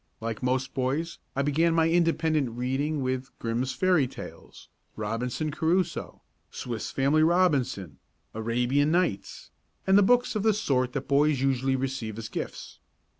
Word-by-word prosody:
Like 115 -1 -4
most 130 +1 -1
boys 140 +6 -2 0.2
I 140 - +1
began 165 +4 +2
my 165 -1 +4
independent 160 -4 +2
reading 135 +4 -1
with 130 0 -2
"Grimm's 120 +3 -2
Fairy 180 -7 +2
Tales," - - -11 0.3
"Robinson 120 +8 -2
Crusoe," 170 +4 -1 0.3
"Swiss 120 -3 -5
Family 140 +4 +2
Robinson," 135 - +1 0.3
"Arabian 120 +6 +1
Nights" 170 - -1 0.3
and 195 +1 +5
books 245 -1 +3
of 210 - 0
the 220 0 +3
sort 130 - 0
that 135 - -4
boys 145 0 +3
usually 135 0 +1
receive 130 -5 -3
as 115 -1 -6
gifts. - - -6
135 Hz, 135 wpm, -27 LUFS, 125-160 Hz, 0.3 s, and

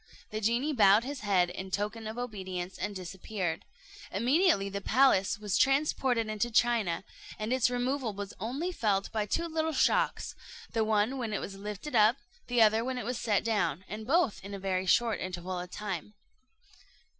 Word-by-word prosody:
The 215 0 -3
genie 240 +8 +1
bowed 210 -2 +6
his 280 +1 -5
head 185 -4 +2
in 190 +1 -6
token 210 +3 -3
of 220 +2 -6
obedience, 190 -6 -5
and 205 +1 -3
disappeared. 185 -1 -4 0.5
Immediately 270 - +3
the 200 0 -4
palace 220 -4 +3
was 210 0 -1
transported 270 -4 +2
into 215 +2 -1
China, 225 -7 +2 0.3
and 215 +3 -2
its 255 -2 +3
removal 250 0 -1
was 200 0 -6
only 270 - -2
felt 200 - 0
by 215 -2 -1
two 335 +10 0
little 320 -1 -1
shocks, - - +1 0.4
the 225 - +2
one 220 +4 +1
when 225 -4 -3
it 210 - 0
was 195 - -6
lifted 210 +7 -6
up, 220 +3 +5 0.3
the 245 -2 +4
other 220 +1 +4
when 255 +1 -3
it 245 - -4
was 245 0 -2
set 220 -5 +1
down, 190 -7 0
and 215 +3 -7
both 280 - +2
in 200 +1 -6
a - - -6
very 190 -1 -1
short 230 +4 +3
interval 180 0 -4
of 180 0 -6
time. 205 0 -5
215 Hz, 180 wpm, -30 LUFS, 195-245 Hz, 0.5 s, bowed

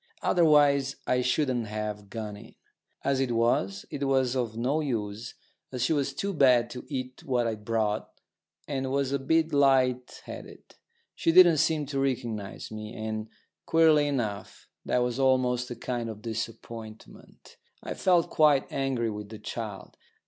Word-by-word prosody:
Otherwise 145 -5 +4
I 125 0 +2
shouldn't 125 -2 0
have 105 -1 -5
gone 110 -2 -5
in. 105 - -14 0.5
As 135 -1 +1
it 135 -2 0
was, 105 -4 +1
it 140 -1 -3
was 130 -2 +2
of 115 -3 -2
no 130 +6 0
use, 115 -6 -3 0.4
as 125 -2 -2
she 140 - +2
was 140 -2 0
too 200 +5 -2
bad 125 -6 +4
to 125 0 -7
eat 130 -3 -5
what 125 -3 0
I'd 110 -2 -3
brought, 110 -2 -1 0.6
and 135 -2 -2
was 140 -1 0
a 140 - 0
bit 160 +4 +1
light 130 -3 +2
headed. - - -9 0.5
She 165 - +1
didn't 175 -2 +7
seem 150 0 +1
to 140 0 -3
recognise 120 -8 -3
me; 110 +1 -7
and, 110 0 -4 0.4
queerly 160 -2 +5
enough, 110 -8 -4 0.2
that 125 - +1
was 125 +1 -2
almost 130 -1 +2
a 120 - -5
kind 120 -2 -3
of 110 -1 -9
disappointment. 110 -1 -8 0.3
I - - -4
felt 180 -3 +2
quite 150 -3 +3
angry 130 -5 -1
with 105 -1 -7
the 110 - -8
child. 105 -2 -7
125 Hz, 155 wpm, -28 LUFS, 110-140 Hz, 0.6 s, didn't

